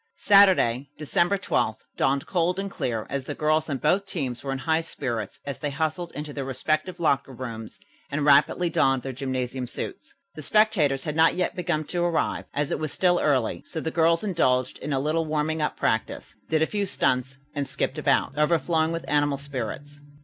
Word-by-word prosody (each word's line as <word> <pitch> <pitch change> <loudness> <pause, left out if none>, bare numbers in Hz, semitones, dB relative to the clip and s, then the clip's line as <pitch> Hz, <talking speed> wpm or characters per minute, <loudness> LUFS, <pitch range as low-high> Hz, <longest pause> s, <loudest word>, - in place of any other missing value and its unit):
Saturday, 180 - +5
December 170 +6 +1
12, 190 - 0 0.2
dawned 135 0 +1
cold 180 0 0
and 195 0 -3
clear, 115 - -2
and 140 - -1
the 145 +2 -5
girls 155 +1 +1
on 140 - -1
both 185 +9 +1
teams 135 -10 -3
were 135 - -3
in 135 - -2
high 160 +5 +1
spirits 120 - -4
as 140 -1 -5
they 150 - -2
hustled 160 +4 -2
into 150 +1 -6
their 140 - -3
respective 155 +7 -2
locker 140 -4 +1
rooms 115 -3 -7 0.3
and 145 0 -1
rapidly 145 +4 +4
donned 135 -4 +2
their 135 - -4
gymnasium 130 -1 -3
suits. - - -6 0.2
The 155 - -8
spectators 160 -8 +2
had 150 -2 -3
not 160 +1 +4
yet 180 -1 -1
begun 175 -3 -1
to 175 +4 -3
arrive, 170 -2 0
as 145 0 -1
it - - -1
was 155 -2 -3
still 180 -1 +2
early, 130 -6 +1
so 160 - -5
the 160 +1 -3
girls 165 +1 +3
indulged 130 -10 +1
in 150 - -5
a 135 - +1
little 155 +4 0
warming 155 +1 -1
up 150 - -1
practice, 110 - -1 0.2
did 160 0 +3
a - - +4
few 205 +3 -2
stunts 130 -5 0 0.2
and 145 -2 -2
skipped 150 - -2
about, 145 - +1
overflowing 160 +1 +2
with 165 0 -4
animal 145 -1 +2
spirits. 140 +1 -6
150 Hz, 195 wpm, -25 LUFS, 135-165 Hz, 0.3 s, Saturday